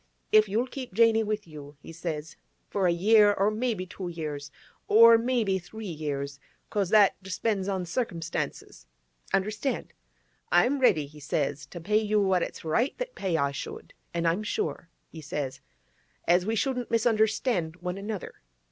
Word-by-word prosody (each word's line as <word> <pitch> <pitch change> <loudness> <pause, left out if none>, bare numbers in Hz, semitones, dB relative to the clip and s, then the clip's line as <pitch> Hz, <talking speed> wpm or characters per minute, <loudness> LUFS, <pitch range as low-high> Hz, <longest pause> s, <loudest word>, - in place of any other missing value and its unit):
—"if 215 -1 +6
you'll 225 +5 +1
keep 255 -5 -8
Janey 225 0 +5
with 215 -1 -2
you," 145 -2 -11
he 165 - -11
says, 160 -2 -5 0.3
"for 195 -3 0
a - - +4
year, 205 +4 +5
or 200 +1 +2
maybe 215 -4 -1
two 185 0 -7
years, 150 -4 -5 0.4
or 230 +2 +8
maybe 230 -5 +1
three 220 +5 -9
years—'cause 145 +5 -4
that 205 -2 +5
depends 195 +1 -2
on 190 -2 -1
cirkinstances"—understand?—"I'm 190 - -3
ready," 175 - +4
he 150 +2 -14
says, 145 0 -2
"to 175 - -9
pay 210 +6 +2
you 215 0 +1
what 190 -3 +2
it's - - -5
right 235 - +1
that - - -4
pay 185 -4 -1
I 140 -2 +1
should, 140 - -7 0.2
an' 170 0 -2
I'm 170 +5 +2
sure," 165 -5 -3 0.2
he 160 - -9
says, 140 -3 -4 0.7
"as 180 +2 +3
we 225 - +1
shouldn't 250 +1 -1
misunderstand 220 -6 +1
one 180 +1 -5
another." 205 -1 -6
190 Hz, 150 wpm, -27 LUFS, 160-220 Hz, 0.7 s, or